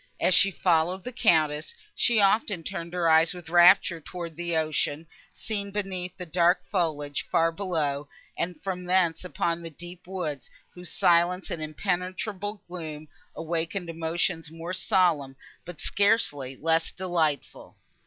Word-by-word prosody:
As 185 - +3
she 195 - +7
followed 180 0 +1
the 250 - -5
Countess, 155 -9 +2 0.2
she 235 -3 +3
often 200 -3 +2
turned 170 -1 -5
her 175 -1 0
eyes 160 +3 +4
with 175 -2 -10
rapture 175 -1 +6
towards 170 -1 -7
the 170 0 -2
ocean, 155 0 -1 0.3
seen 205 -2 -4
beneath 190 -3 -4
the 180 - -6
dark 175 +2 +2
foliage, 150 -6 -1
far 165 0 +3
below, 155 -6 -2 0.3
and 175 -2 -3
from 180 -2 -4
thence 180 -3 +2
upon 170 -2 -2
the 165 - -5
deep 175 +3 -11
woods, 165 -7 -4 0.2
whose 180 -1 -9
silence 180 -2 +2
and 160 - -3
impenetrable 185 +5 -3
gloom 155 -4 -7 0.3
awakened 165 +2 -3
emotions 165 0 -1
more 165 +3 -6
solemn, 170 -8 +1 0.3
but 175 -3 -9
scarcely 175 - +1
less 165 +1 +1
delightful. 165 -6 -2
175 Hz, 140 wpm, -27 LUFS, 160-185 Hz, 0.3 s, she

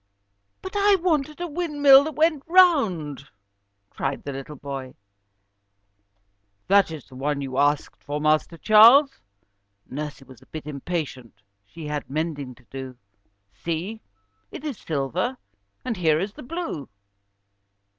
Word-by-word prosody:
"But 375 - -7
I 405 0 +5
wanted 310 -5 0
a 350 - -2
windmill 290 -4 +5
which 315 -2 -5
went 310 -2 +2
round," 220 - +3 0.6
cried 135 0 -3
the 140 - -5
little 135 +3 -7
boy. 135 -2 -7 1.7
"That 200 -1 +5
is 155 -4 -8
the 135 - -18
one 140 +2 -2
you 135 -1 -3
asked 145 0 0
for, 145 +1 -3
Master 155 +2 +1
Charles," 235 - +6 0.7
Nursie 145 0 -6
was 130 -2 -16
a 130 - -20
bit 155 -2 -8
impatient, 140 - -5 0.2
she 165 +8 -10
had 150 -1 -4
mending 145 -3 -3
to 125 - -22
do. 130 -2 -7 0.6
"See, 175 +7 -4 0.5
it - - -9
is 280 -9 -4
silver, 165 - -2 0.5
and 245 - -2
here 160 -4 +2
is 195 +3 -3
the - - -11
blue." 300 - -5
160 Hz, 135 wpm, -24 LUFS, -, 1.7 s, Charles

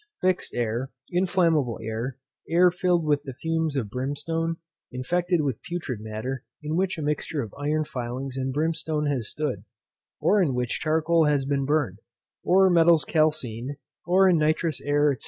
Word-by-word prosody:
fixed 185 0 0
air, 120 +2 -1 0.2
inflammable 170 - +2
air, 115 +4 -4 0.3
air 175 +2 +5
filled 180 -2 +1
with 145 -1 +2
the 135 -3 -7
fumes 160 +2 -1
of 115 -7 -2
brimstone, 145 +6 -2 0.4
infected 175 +7 0
with 135 -6 -2
putrid 165 -10 -4
matter, 110 +5 -4 0.2
in 150 +1 -2
which 185 0 0
a 155 - -4
mixture 150 0 -1
of 110 - -9
iron 155 +1 0
filings 130 0 -5
and 135 0 -2
brimstone 155 +1 -1
has 135 -7 -1
stood, 150 -4 -3 0.6
or 205 0 +3
in 145 -8 +1
which 125 -1 -1
charcoal 160 +1 +2
has 145 -2 +2
been 140 -1 0
burned, 140 -9 0 0.4
or 190 +1 +5
metals 170 -2 +5
calcined, 145 -5 0 0.3
or 190 +2 +5
in 175 -3 +4
nitrous 155 0 +1
air, 145 0 +3
&c. 130 - -9
150 Hz, 160 wpm, -26 LUFS, 130-165 Hz, 0.6 s, air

